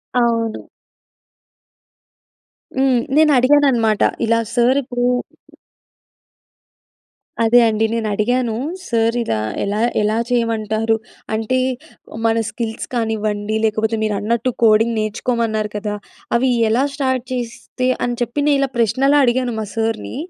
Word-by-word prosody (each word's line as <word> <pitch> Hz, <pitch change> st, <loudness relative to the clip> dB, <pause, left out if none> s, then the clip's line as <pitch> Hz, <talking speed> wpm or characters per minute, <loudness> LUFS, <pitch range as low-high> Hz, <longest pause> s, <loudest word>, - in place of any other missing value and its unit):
అవును. 230 Hz, -2 st, 0 dB, 2.1 s
హ్మ్. 265 Hz, -2 st, +3 dB, 0.2 s
నేను 310 Hz, 0 st, +5 dB
అడిగానన్నమాట. 255 Hz, -5 st, +3 dB, 0.2 s
ఇలా 230 Hz, 0 st, +2 dB, 0.2 s
సార్ 245 Hz, +2 st, +3 dB
ఇప్పుడు 245 Hz, 0 st, -2 dB, 2.4 s
అదే 230 Hz, +2 st, +5 dB
అండి. 220 Hz, 0 st, +1 dB
నేనడిగాను, 230 Hz, +2 st, 0 dB, 0.3 s
సార్ 230 Hz, 0 st, +1 dB
ఇలా 110 Hz, -, -1 dB, 0.2 s
ఎలా, 205 Hz, +2 st, -1 dB, 0.2 s
ఎలా 210 Hz, +1 st, +1 dB
చేయమంటారు? 225 Hz, -2 st, 0 dB, 0.4 s
అంటే 225 Hz, +4 st, 0 dB, 0.7 s
మన 225 Hz, 0 st, +2 dB
స్కిల్స్ 225 Hz, -2 st, -5 dB
కానివ్వండి 215 Hz, -2 st, -1 dB
లేకపోతే 220 Hz, +1 st, 0 dB
మీరన్నట్టు 220 Hz, +3 st, 0 dB
కోడింగ్ 225 Hz, +1 st, +4 dB
నేర్చుకోమన్నారు 220 Hz, 0 st, -1 dB
కదా! 210 Hz, 0 st, -3 dB, 0.4 s
అవి 255 Hz, +2 st, +2 dB, 0.2 s
ఎలా 235 Hz, +5 st, +2 dB
స్టార్ట్ 260 Hz, -3 st, -1 dB
చేస్తే, 250 Hz, +1 st, -4 dB, 0.2 s
అని 245 Hz, 0 st, -2 dB
చెప్పి 240 Hz, +4 st, -2 dB
నేనిలా 275 Hz, -2 st, +2 dB
ప్రశ్నలా 265 Hz, +5 st, +3 dB
అడిగాను 245 Hz, 0 st, 0 dB
మా 215 Hz, -, -3 dB
సార్‌ని 225 Hz, 0 st, -2 dB
230 Hz, 105 wpm, -19 LUFS, 220-250 Hz, 2.4 s, నేను